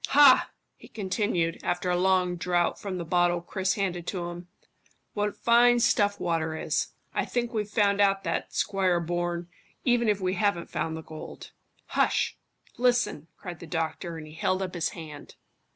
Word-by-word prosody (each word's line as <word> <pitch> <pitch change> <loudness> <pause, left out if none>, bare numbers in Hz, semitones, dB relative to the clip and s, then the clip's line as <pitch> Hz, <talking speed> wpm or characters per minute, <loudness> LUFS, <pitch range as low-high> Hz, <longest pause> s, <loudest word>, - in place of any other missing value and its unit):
Hah!" 280 -2 +7 0.3
he - - -14
continued, 190 -5 -1
after 175 +1 -1
a - - +2
long 180 0 +2
draught 175 0 0
from 195 -3 -4
the 170 - -4
bottle 175 +1 +2
Chris 185 +2 -1
handed 180 -4 -2
to 175 -3 -3
him. 175 0 -9 0.7
"What 210 0 -1
fine 240 +1 +5
stuff 205 -3 +2
water 160 -2 -1
is. - - 0 0.3
I - - 0
think 240 -1 -2
we've 210 -2 -2
found 205 -1 +2
out 195 -1 +3
that, - - -2
Squire 190 -3 +1
Bourne, 175 0 -2 0.4
even 240 -3 +3
if 205 -1 +2
we 185 -1 0
haven't 195 -2 0
found 160 0 -2
the 160 - -8
gold." 155 0 -9 0.4
"Hush! - - +1 0.4
Listen!" 245 -10 +1
cried 175 -4 -8
the 170 - -9
doctor, 165 +1 -3
and 155 - -8
he 155 - -12
held 185 +4 0
up 185 - -5
his 170 -2 -1
hand. 155 -3 -10
180 Hz, 170 wpm, -27 LUFS, 170-205 Hz, 0.7 s, Hah